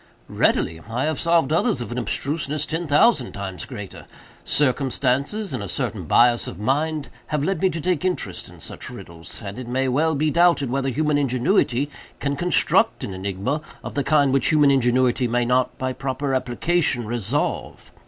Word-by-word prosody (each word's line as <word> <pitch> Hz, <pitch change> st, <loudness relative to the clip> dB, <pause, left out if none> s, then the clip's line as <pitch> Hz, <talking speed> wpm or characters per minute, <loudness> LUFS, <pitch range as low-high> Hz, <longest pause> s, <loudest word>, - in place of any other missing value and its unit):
"Readily; 80 Hz, 0 st, +1 dB
I 120 Hz, +3 st, -1 dB
have 155 Hz, -1 st, -1 dB
solved 165 Hz, -3 st, +2 dB
others 170 Hz, -, +2 dB
of 120 Hz, -, -5 dB
an 125 Hz, -, -2 dB
abstruseness 150 Hz, +5 st, -1 dB
ten 165 Hz, +1 st, -3 dB
thousand 145 Hz, -, +3 dB
times 95 Hz, -2 st, -6 dB
greater. 105 Hz, -7 st, -9 dB, 0.4 s
Circumstances, 140 Hz, -, 0 dB
and 125 Hz, -, -3 dB
a 100 Hz, -, -5 dB
certain -, -, -3 dB
bias 120 Hz, 0 st, +4 dB
of -, -, -7 dB
mind, 145 Hz, +7 st, -1 dB, 0.2 s
have 150 Hz, -2 st, -1 dB
led 190 Hz, 0 st, -1 dB
me 190 Hz, -, +4 dB
to 170 Hz, -1 st, -4 dB
take 175 Hz, -1 st, 0 dB
interest 185 Hz, -1 st, -2 dB
in -, -, -15 dB
such -, -, -7 dB
riddles, 85 Hz, +6 st, -9 dB
and 100 Hz, +5 st, -6 dB
it 125 Hz, -, -7 dB
may 130 Hz, +2 st, 0 dB
well 155 Hz, +5 st, +1 dB
be 150 Hz, +2 st, +1 dB
doubted 170 Hz, -6 st, +3 dB
whether 135 Hz, 0 st, 0 dB
human 150 Hz, +2 st, +1 dB
ingenuity 135 Hz, -, +1 dB, 0.3 s
can 140 Hz, 0 st, -1 dB
construct 175 Hz, +5 st, +2 dB
an 95 Hz, -, -4 dB
enigma 100 Hz, +10 st, -2 dB, 0.2 s
of -, -, -6 dB
the 140 Hz, -, 0 dB
kind 145 Hz, -2 st, +3 dB
which 135 Hz, -3 st, +2 dB
human 150 Hz, -2 st, +5 dB
ingenuity 125 Hz, -1 st, +2 dB
may 120 Hz, +1 st, +1 dB
not, 125 Hz, +1 st, +1 dB
by 130 Hz, 0 st, -2 dB
proper 135 Hz, +1 st, -3 dB
application, 130 Hz, +1 st, 0 dB
resolve. 115 Hz, -2 st, -2 dB
135 Hz, 175 wpm, -23 LUFS, 120-155 Hz, 0.4 s, human